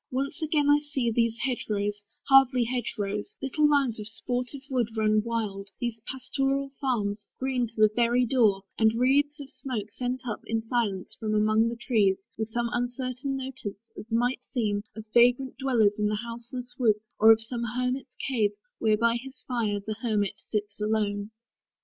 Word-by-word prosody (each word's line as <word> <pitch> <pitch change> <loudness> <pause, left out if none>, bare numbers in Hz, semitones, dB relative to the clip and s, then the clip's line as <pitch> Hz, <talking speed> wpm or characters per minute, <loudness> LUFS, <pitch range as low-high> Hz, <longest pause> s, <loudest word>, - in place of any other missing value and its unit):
Once 275 +4 -2
again 300 -2 +2
I 290 0 +6
see 275 -5 -1
These 230 0 +1
hedge 255 -3 -2
rows, 205 0 -1 0.3
hardly 265 -2 +6
hedge 245 0 -2
rows, 210 - -3
little 295 +3 +2
lines 275 -6 +2
Of 210 - -5
sportive 250 +4 -3
wood 240 -5 -1
run 215 0 +3
wild; 210 -4 -3
these 235 -2 -3
pastoral 270 +1 -1
farms 210 -6 -1
Green 255 -2 0
to 225 - -17
the 215 -1 +5
very 240 +1 +3
door; 220 -6 +3 0.2
and 220 0 +4
wreathes 285 +5 +2
of 275 -2 -9
smoke 250 -6 -5
Sent 250 +2 -3
up, 215 - -3
in 225 0 -1
silence, 225 -5 -1
from 215 -1 -1
among 215 +2 +3
the 235 - -4
trees, 215 -5 +2 0.2
With 220 0 -2
some 235 +1 -1
uncertain 255 +2 -2
notice, 245 -5 -7
as 215 - -9
might 245 +3 +1
seem, 210 -5 -1
Of 220 -1 -8
vagrant 245 +2 +4
dwellers 225 -6 +2
in 210 - +2
the 210 - 0
houseless 240 +2 -6
woods, 215 -3 +1
Or 220 +1 +9
of 225 - +6
some 235 +2 -5
hermit's 250 +3 -2
cave, 220 -6 +1 0.3
where 215 -2 +3
by 235 +1 +3
his 260 +1 -10
fire 225 -5 0
The 215 +1 -5
hermit 210 -5 +1 0.2
sits 210 -1 -3
alone. 210 -1 0
235 Hz, 175 wpm, -27 LUFS, 215-255 Hz, 0.3 s, Or